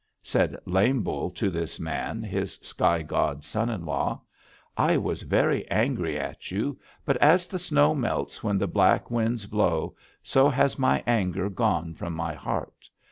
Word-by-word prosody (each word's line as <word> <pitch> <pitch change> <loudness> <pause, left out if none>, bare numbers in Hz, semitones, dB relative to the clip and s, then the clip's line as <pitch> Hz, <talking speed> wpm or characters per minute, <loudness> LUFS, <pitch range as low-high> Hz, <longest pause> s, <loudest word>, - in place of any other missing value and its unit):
"Said - - +1
Lame 105 +7 +2
Bull - - -2
to 100 - -2
this 85 -1 -4
man, 80 -2 -3
his - - -3
sky 85 -1 +1
god 75 -1 -1
son 110 +10 -1
in 100 -8 -4
law, 70 -4 -1 0.6
'I - - +3
was - - -2
very - - +1
angry - - 0
at - - -6
you, 110 +9 -2 0.3
but 140 - +2
as 170 +7 +5
the 185 - -4
snow 155 -3 +3
melts 95 - -2
when 105 -3 +1
the 100 - +1
black 95 - +3
winds 115 -2 0
blow, 95 -6 0 0.3
so 135 +2 +4
has 140 0 +1
my 130 - +2
anger 100 -4 0
gone 85 -7 0
from 85 +1 -5
my 80 -1 -3
heart. - - -5
100 Hz, 165 wpm, -26 LUFS, 85-130 Hz, 0.6 s, as